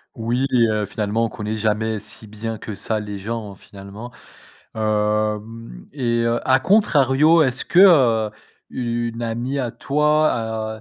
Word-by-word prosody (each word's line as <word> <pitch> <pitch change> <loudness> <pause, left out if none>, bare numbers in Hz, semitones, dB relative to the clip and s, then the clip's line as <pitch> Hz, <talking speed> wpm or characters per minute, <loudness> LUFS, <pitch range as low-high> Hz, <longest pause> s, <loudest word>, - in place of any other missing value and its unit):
Oui, 120 +4 -1 0.2
heu, 105 -1 -1
finalement 105 +2 -1
on - - -3
connaît 110 0 -5
jamais 110 0 -1
si 105 +2 -6
bien 110 +1 -6
que 105 - -7
ça 110 +3 -2
les 105 -1 -6
gens, 105 0 -5
finalement. 100 +5 -11 0.6
Hem 105 - -2
et 120 -4 -1 0.2
à 130 0 +4
contrario, 155 -5 +4
est-ce 130 -2 -1
que, 175 - +2
heu, 125 - +5 0.4
une 120 -1 -3
amie 120 +4 -3
à 125 -3 -2
toi, 120 -8 0
115 Hz, 135 wpm, -21 LUFS, 105-130 Hz, 0.6 s, heu